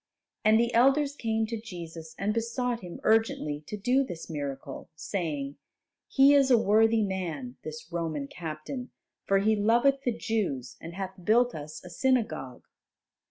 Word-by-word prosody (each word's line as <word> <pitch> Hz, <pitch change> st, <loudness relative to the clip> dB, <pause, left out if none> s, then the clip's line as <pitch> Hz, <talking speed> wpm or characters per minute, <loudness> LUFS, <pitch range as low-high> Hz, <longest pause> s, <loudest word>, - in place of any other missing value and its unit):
And 215 Hz, +1 st, +5 dB
the 235 Hz, +1 st, +1 dB
elders 275 Hz, +4 st, +4 dB
came 225 Hz, -4 st, 0 dB
to 225 Hz, 0 st, -5 dB
Jesus 165 Hz, -6 st, -8 dB
and 205 Hz, +2 st, 0 dB
besought 235 Hz, +1 st, -1 dB
Him 180 Hz, -4 st, -9 dB
urgently 215 Hz, -9 st, +2 dB
to 210 Hz, -, -5 dB
do 250 Hz, +7 st, +2 dB
this 175 Hz, -8 st, -7 dB
miracle, 140 Hz, -2 st, -5 dB
saying, 150 Hz, -6 st, -3 dB, 0.5 s
"He 275 Hz, +1 st, +6 dB
is 275 Hz, -2 st, +5 dB
a 245 Hz, -, +7 dB
worthy 220 Hz, +1 st, +4 dB
man, 165 Hz, -10 st, -4 dB
this 155 Hz, +2 st, -8 dB
Roman 160 Hz, -4 st, -2 dB
captain, 165 Hz, -, -6 dB, 0.4 s
for 195 Hz, -, +4 dB
he 215 Hz, +3 st, +3 dB
loveth 240 Hz, +6 st, +3 dB
the 245 Hz, -4 st, -1 dB
Jews 145 Hz, -, -2 dB
and 165 Hz, +1 st, -8 dB
hath 190 Hz, -1 st, -6 dB
built 240 Hz, +5 st, +4 dB
us 150 Hz, +1 st, -8 dB
a -, -, -8 dB
synagogue." 225 Hz, -, 0 dB
205 Hz, 155 wpm, -28 LUFS, 160-235 Hz, 0.5 s, a